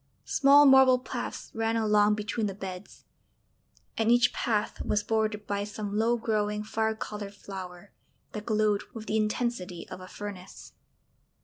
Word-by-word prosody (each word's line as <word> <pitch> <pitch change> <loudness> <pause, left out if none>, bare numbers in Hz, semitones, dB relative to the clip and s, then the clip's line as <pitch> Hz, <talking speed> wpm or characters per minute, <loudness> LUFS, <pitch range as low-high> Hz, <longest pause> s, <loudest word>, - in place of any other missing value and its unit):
Small 285 +1 +6
marble 265 -2 +7
paths 255 - -6
ran 225 0 0
along 210 -1 +3
between 215 +1 -2
the 195 - -5
beds, 190 -1 -9 0.9
and 225 0 +1
each 245 0 +4
path 215 -3 -1
was 210 0 0
bordered 215 -1 -1
by 200 0 -2
some 205 0 -5
low 230 +3 +2
growing 210 -2 -1
fire 220 +1 -1
coloured 210 -2 -6
flower 190 -1 -9 0.4
that 210 -1 -7
glowed 215 -2 +2
with 220 -1 -7
the 220 - 0
intensity 215 -5 -2
of 185 - -8
a 185 - -9
furnace. 195 -2 -9
210 Hz, 145 wpm, -28 LUFS, 205-225 Hz, 0.9 s, marble